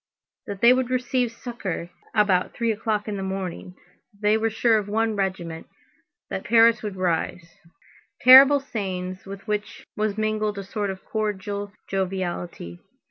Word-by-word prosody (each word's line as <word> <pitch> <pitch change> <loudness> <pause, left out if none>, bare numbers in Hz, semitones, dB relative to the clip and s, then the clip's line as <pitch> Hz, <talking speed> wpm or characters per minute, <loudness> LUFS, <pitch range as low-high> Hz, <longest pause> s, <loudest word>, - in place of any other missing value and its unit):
That 200 -1 -6
they 235 +1 +7
would 255 -1 0
receive 250 -1 0
succor 210 -8 -6 0.2
about 200 -4 +2
three 230 -1 0
o'clock 215 -1 -2
in 210 -1 -3
the - - -4
morning—that 190 +1 -7
they 210 0 +3
were 225 +1 +1
sure 220 0 +2
of 205 - -6
one 225 +1 0
regiment, 185 -5 -3 0.6
that - - -5
Paris 230 -1 +5
would 210 -3 -5
rise. 170 -2 -2 0.6
Terrible 270 +3 +9
sayings 185 -7 -5
with 195 0 -9
which 210 0 -4
was 210 -1 -1
mingled 215 -1 -1
a 200 - -4
sort 200 +1 -3
of 190 -1 -7
cordial 205 -1 -3 0.2
joviality. 180 - -4
205 Hz, 145 wpm, -24 LUFS, 190-225 Hz, 0.6 s, Terrible